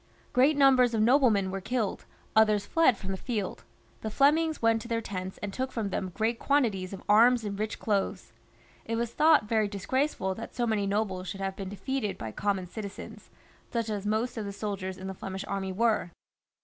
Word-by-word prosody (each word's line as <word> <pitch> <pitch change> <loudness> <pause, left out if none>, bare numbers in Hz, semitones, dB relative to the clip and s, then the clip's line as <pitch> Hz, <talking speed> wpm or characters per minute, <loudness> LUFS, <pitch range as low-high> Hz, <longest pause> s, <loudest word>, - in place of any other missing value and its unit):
Great 275 +4 +4
numbers 255 -4 +5
of 215 - +2
noblemen 225 -6 +4
were 195 0 -4
killed, 225 0 -2 0.3
others 215 -2 +4
fled 325 -9 +3
from 195 - -5
the 190 - -3
field; 210 -3 -4 0.4
the 220 - -3
Flemings 305 +6 +3
went 225 -1 +2
to 235 - -8
their 230 -1 0
tents 190 -4 -5
and 200 -1 -4
took 260 +3 -2
from 215 -4 -3
them 185 - -2
great 230 +2 0
quantities 220 -10 +1
of 195 - -8
arms 235 +3 +5
and 200 -1 -4
rich 215 0 -2
clothes. 200 -3 -2 0.5
It 230 - -3
was 235 0 -1
thought 310 -6 +5
very 220 -1 +2
disgraceful 205 0 -1
that 230 +4 -8
so 240 - 0
many 215 -3 0
nobles 195 -2 -1
should 195 - -5
have 195 0 -2
been 195 -1 -6
defeated 210 +2 -3
by 110 - -5
common 195 - -1
citizens, 200 +2 -8 0.4
such 230 -2 -1
as 205 -1 -3
most 220 +4 -1
of 215 - -3
the 200 - -5
soldiers 195 -2 -4
in 190 - -8
the 190 - -4
Flemish 190 +1 -6
army 195 -1 -3
were. 220 -2 +1
215 Hz, 200 wpm, -29 LUFS, 195-240 Hz, 0.5 s, numbers